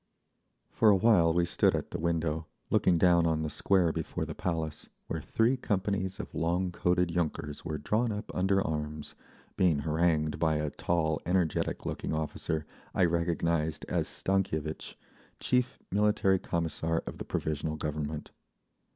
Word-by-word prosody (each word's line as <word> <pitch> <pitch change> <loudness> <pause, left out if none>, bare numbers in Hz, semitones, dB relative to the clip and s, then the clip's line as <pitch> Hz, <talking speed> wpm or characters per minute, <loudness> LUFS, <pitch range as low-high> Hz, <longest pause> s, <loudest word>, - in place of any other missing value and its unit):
For 110 - +4
a 100 - +7
while 95 -5 +5
we 85 +1 +2
stood 85 - +2
at - - -4
the - - -3
window, 80 -1 -1 0.2
looking 90 - +4
down 85 -1 +4
on 80 -1 0
the 75 - -3
Square 90 -2 +2
before - - -3
the - - -5
Palace, 80 -4 -3 0.2
where - - -4
three 115 +4 +2
companies 100 -5 -1
of - - -6
long 90 +2 0
coated 90 0 +1
yunkers 75 -4 -2
were 80 -2 -3
drawn 110 +10 0
up 105 +1 -5
under 95 +1 +2
arms, 75 -1 -4 0.4
being 85 -6 +3
harangued 80 0 +1
by 80 -2 +2
a 75 -1 -1
tall, 80 -1 0
energetic 90 -2 0
looking - - -3
officer 80 0 -2 0.3
I 95 - +4
recognised 85 -2 0
as - - 0
Stankievitch, 80 -5 -1 0.4
chief 125 0 +1
Military 100 -1 +3
Commissar 80 -1 -1
of - - -7
the - - -3
Provisional 80 0 -2
Government. 75 0 -4
85 Hz, 150 wpm, -30 LUFS, 80-95 Hz, 0.4 s, a